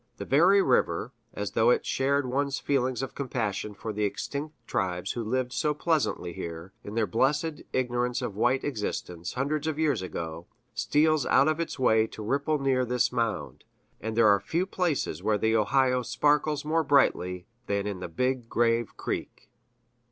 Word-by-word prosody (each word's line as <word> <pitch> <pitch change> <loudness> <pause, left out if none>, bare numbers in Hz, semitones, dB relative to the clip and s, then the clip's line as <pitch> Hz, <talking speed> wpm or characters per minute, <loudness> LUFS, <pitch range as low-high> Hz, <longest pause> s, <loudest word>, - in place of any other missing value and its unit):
The - - -6
very 180 +9 +5
river, - - +1 0.2
as - - -4
though - - +3
it 480 -3 +2
shared 140 +1 +1
one's 140 +2 -1
feelings 130 -2 0
of 135 - -5
compassion 105 -6 -3
for 110 +2 -5
the 105 +1 -2
extinct 145 +9 -3
tribes 90 -1 -2
who 120 - -3
lived 125 +2 -1
so 150 -1 0
pleasantly 150 - 0
here, 85 0 -7
in 105 - -7
their 115 -1 +2
blessed 150 +8 0
ignorance 125 -1 0
of 100 - -4
white 125 +5 +2
existence, 95 - -4
hundreds 145 +4 -1
of 155 -2 -1
years 150 -9 +1
ago, 85 -2 -6 0.3
steals 155 0 +2
out 135 - +5
of 155 +1 +1
its 170 - -3
way 110 -4 +3
to 110 - -9
ripple 140 +7 0
near 135 -2 +1
this 125 0 +1
mound; 115 -2 -2 0.4
and 110 +1 -4
there 115 -2 +6
are 100 -1 +5
few 165 - -1
places 170 - -1
where 105 +2 +1
the 110 +2 +1
Ohio 125 +3 +3
sparkles 150 +4 +1
more 160 +1 +1
brightly 90 - +2 0.2
than 100 0 0
in 100 -3 -3
the 90 - -6
Big 125 +5 -1
Grave 115 -1 +1
Creek." - - -5
125 Hz, 175 wpm, -28 LUFS, 105-145 Hz, 0.4 s, there